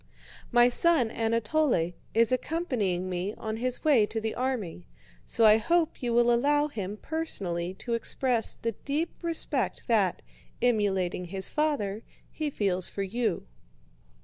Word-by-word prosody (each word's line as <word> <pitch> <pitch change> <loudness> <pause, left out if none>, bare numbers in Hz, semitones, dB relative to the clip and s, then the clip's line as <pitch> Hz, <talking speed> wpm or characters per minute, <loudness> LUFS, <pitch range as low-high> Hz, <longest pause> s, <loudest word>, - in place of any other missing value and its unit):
"My 240 -1 +6
son 250 -2 +4
Anatole 230 - 0 0.2
is 230 0 +4
accompanying 250 - -1
me 185 +3 -3
on 220 0 -5
his 250 +1 -2
way 260 -9 +4
to 225 - -3
the 220 0 -3
army, 240 - -3 0.4
so 230 - +2
I 215 0 +7
hope 335 +7 0
you 245 -2 -1
will 240 0 +4
allow 290 +5 +2
him 205 -6 -5
personally 190 - -2
to 235 +5 -5
express 235 +1 +1
the 230 - -3
deep 300 +4 -1
respect 325 -6 -1
that, 205 -6 +1 0.4
emulating 195 -7 0
his 190 +2 -2
father, 225 -10 -1 0.3
he 310 -1 -3
feels 190 -8 -1
for 200 - -4
you." 215 0 -2
230 Hz, 140 wpm, -28 LUFS, 195-270 Hz, 0.4 s, I